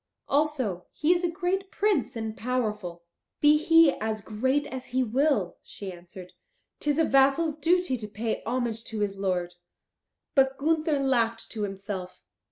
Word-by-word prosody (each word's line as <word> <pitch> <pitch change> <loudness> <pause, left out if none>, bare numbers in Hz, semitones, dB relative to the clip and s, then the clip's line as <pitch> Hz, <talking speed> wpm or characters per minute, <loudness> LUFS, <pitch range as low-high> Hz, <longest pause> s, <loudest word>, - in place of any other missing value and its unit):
Also 270 - 0
he 310 +4 +3
is 350 0 -1
a 350 - +2
great 375 +2 -2
prince 400 - 0
and 220 -1 -3
a - - -21
powerful." 210 -9 -3 0.4
"Be 295 0 +6
he 325 0 +6
as 215 0 -2
great 260 +7 0
as 260 -1 -7
he 255 +1 +1
will," 250 - +1
she 195 -2 -8
answered, 180 +1 -12 0.5
"'tis 295 -1 0
a 325 - +4
vassal's 275 +4 +3
duty 335 -3 +1
to 215 -2 -7
pay 220 +2 -3
homage 235 -3 -2
to 220 -2 -4
his 200 -1 -1
lord." 180 -3 -1 0.8
But 270 -1 +3
Gunther 310 +1 +1
laughed 230 -4 0
to 220 - -5
himself. 195 -2 -5
255 Hz, 160 wpm, -27 LUFS, 210-300 Hz, 0.8 s, Be